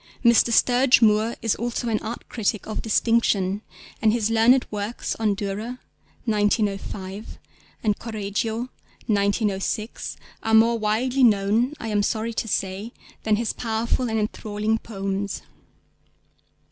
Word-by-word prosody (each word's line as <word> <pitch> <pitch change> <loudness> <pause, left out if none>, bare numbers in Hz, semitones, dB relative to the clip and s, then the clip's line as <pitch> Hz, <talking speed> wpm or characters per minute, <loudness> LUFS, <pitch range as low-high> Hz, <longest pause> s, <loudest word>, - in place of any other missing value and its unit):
Mr. 235 0 +5
Sturge 250 +2 +5
Moore 215 +1 +3
is 225 - +2
also 240 +1 -3
an 220 -2 +1
art 230 +2 -6
critic 215 -2 -1
of 215 - -4
distinction, 210 -3 +2 0.4
and 220 - +4
his 225 -1 0
learned 235 +3 +5
works 210 +2 -3
on 215 -2 +1
Dürer 210 +4 -4 0.5
(1905) 205 -2 -1 0.5
and 210 -2 +1
Correggio 220 +2 -3 0.4
(1906) 205 +1 -1 0.2
are 225 0 +2
more 230 +1 +5
widely 245 +5 +1
known 220 +4 +3
(I 225 - -4
am 205 -1 +2
sorry 220 +2 -1
to 225 - -2
say) 195 +3 -2 0.3
than 215 -1 +2
his 225 0 -1
powerful 230 +2 -1
and 220 - 0
enthralling 215 0 -1
poems. 195 -1 -4
220 Hz, 125 wpm, -24 LUFS, 205-230 Hz, 0.5 s, Mr